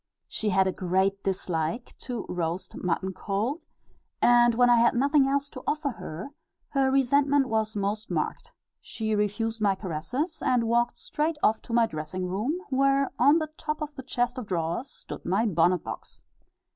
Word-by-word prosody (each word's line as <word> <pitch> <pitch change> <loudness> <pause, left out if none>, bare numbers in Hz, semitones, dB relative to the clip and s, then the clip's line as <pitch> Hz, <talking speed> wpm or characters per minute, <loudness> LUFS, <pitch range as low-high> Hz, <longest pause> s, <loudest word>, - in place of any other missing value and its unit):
She 215 - -2
had 190 0 +3
a 190 - +1
great 190 +2 0
dislike 180 +2 -2
to 245 -2 -4
roast 175 +2 -3
mutton 185 +2 -2
cold, 220 - -2 0.5
and 240 -1 +5
when 245 +1 +5
I 240 -1 +6
had 235 +1 +4
nothing 280 +2 +4
else 280 +1 0
to 255 - -8
offer 300 -2 0
her, 185 - -7 0.4
her 270 -1 +2
resentment 275 +1 +3
was 220 -1 0
most 205 +2 -2
marked: - - -3 0.3
she 220 -1 -3
refused 215 +2 -1
my 200 -2 +3
caresses, 225 - -3
and 245 -2 +2
walked 235 +1 +1
straight 305 +1 -2
off 220 - +3
to 230 - -8
my 235 -1 +5
dressing 155 +1 -4
room, 215 - -1
where 275 +1 +3
on 290 +3 +6
the 310 -2 -2
top 305 -1 -3
of 300 -1 -5
the 280 - -7
chest 245 0 -1
of 235 - -7
drawers 170 - -2
stood - - -9
my 195 +6 +1
bonnet 175 -3 +2
box. 110 - -8
225 Hz, 170 wpm, -27 LUFS, 190-270 Hz, 0.5 s, I